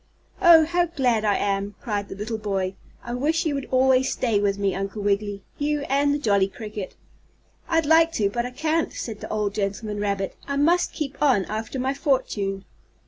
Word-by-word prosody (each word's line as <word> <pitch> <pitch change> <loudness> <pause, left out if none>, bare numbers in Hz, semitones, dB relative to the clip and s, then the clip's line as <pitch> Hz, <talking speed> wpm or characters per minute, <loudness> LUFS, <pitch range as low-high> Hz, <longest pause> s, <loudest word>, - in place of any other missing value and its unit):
"Oh, 330 -2 +8
how 345 +2 +1
glad 250 -9 +1
I 205 -2 +2
am!" 200 0 -1
cried 205 -3 -3
the - - -6
little 220 +2 -4
boy. 195 -3 -2 0.3
"I 240 -1 -5
wish 315 +7 0
you 310 - +1
would 275 -2 -4
always 260 0 +3
stay 225 -5 +1
with 200 -1 +1
me, 200 -1 0
Uncle 195 +2 -4
Wiggily 200 0 -1 0.2
you 295 0 0
and 285 +1 +3
the 290 - +1
jolly 200 -8 +2
cricket." 210 -1 -7 0.7
"I'd 325 -1 +2
like 325 +2 +5
to, 205 - +1
but 235 +4 -2
I 245 - -4
can't," 315 +5 -1
said 220 -3 -6
the - - -8
old 210 -2 -1
gentleman 205 +1 -3
rabbit. 200 -2 -2
"I 280 - -2
must 340 +5 +2
keep 280 -3 -5
on 255 -10 +3
after 220 +5 -4
my 260 +1 0
fortune." 205 -9 -1
225 Hz, 195 wpm, -24 LUFS, 200-285 Hz, 0.7 s, Oh